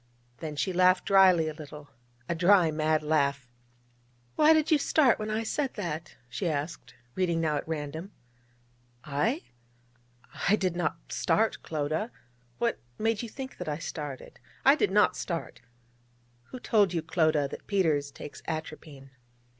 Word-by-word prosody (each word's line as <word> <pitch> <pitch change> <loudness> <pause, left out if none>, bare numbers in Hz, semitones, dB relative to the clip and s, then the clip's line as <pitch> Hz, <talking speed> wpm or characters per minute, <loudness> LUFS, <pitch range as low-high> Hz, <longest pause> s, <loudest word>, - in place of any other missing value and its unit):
Then 155 +3 -6
she 185 +6 -1
laughed 185 0 +4
dryly 185 -4 +5
a 155 - -3
little 150 -1 -11 0.4
a - - 0
dry, 175 0 +4
mad 155 0 +1
laugh. 140 -3 +1 0.9
'Why 305 +1 +6
did 315 -1 +3
you 305 - +5
start 275 -5 +3
when 215 0 -3
I 220 +1 -1
said 270 +4 -2
that?' 170 -6 -5
she 125 +8 -2
asked, 150 -2 -4 0.2
reading 175 -3 0
now 155 -2 +1
at - - -5
random. 160 +4 -5 0.9
'I! 185 - -1 1.1
I 205 - +6
did 185 -4 -1
not 175 -2 -3
start, 220 +1 +1
Clodagh! 155 +7 -2 0.5
What 235 -1 0 0.2
made 220 -1 0
you 235 - -6
think 265 +2 -8
that - - -4
I 150 - -2
started? 150 -4 -7 0.3
I - - +8
did - - +1
not - - +3
start! - - -5 0.8
Who 255 - -9
told 205 -7 +2
you, 165 - -1
Clodagh, 155 -4 +1
that - - -9
Peters 160 -8 +1
takes 140 - -10
atropine?' 155 -4 -7
165 Hz, 150 wpm, -28 LUFS, 150-205 Hz, 1.1 s, I